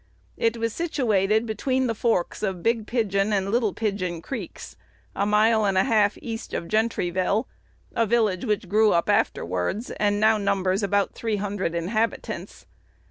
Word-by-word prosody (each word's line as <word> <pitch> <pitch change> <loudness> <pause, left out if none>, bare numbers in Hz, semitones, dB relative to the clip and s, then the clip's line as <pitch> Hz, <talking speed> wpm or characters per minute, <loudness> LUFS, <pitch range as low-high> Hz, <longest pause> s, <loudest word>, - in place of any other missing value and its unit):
It 230 0 0
was 230 -1 -2
situated 220 - +1
between 255 +4 0
the 230 - 0
forks 225 -5 0
of 190 -4 -2
Big 230 -2 +1
Pigeon 210 -4 0
and 195 -1 0
Little 230 -2 +2
Pigeon 190 -5 -2
Creeks, 265 +11 -7 0.4
a 200 - 0
mile 215 +1 +4
and 195 -2 +1
a 190 - +5
half 210 -2 +2
east 225 -1 -5
of 170 - -3
Gentryville, 210 -1 0 0.5
a 230 -1 +2
village 215 -5 +1
which 210 -4 -1
grew 215 +3 +4
up 170 - +1
afterwards, 90 - 0
and 205 -1 0
now 215 0 +4
numbers 195 -1 0
about 200 -1 +1
three 225 -2 -2
hundred 200 -4 -2
inhabitants. 215 +7 -3
210 Hz, 155 wpm, -25 LUFS, 195-225 Hz, 0.5 s, a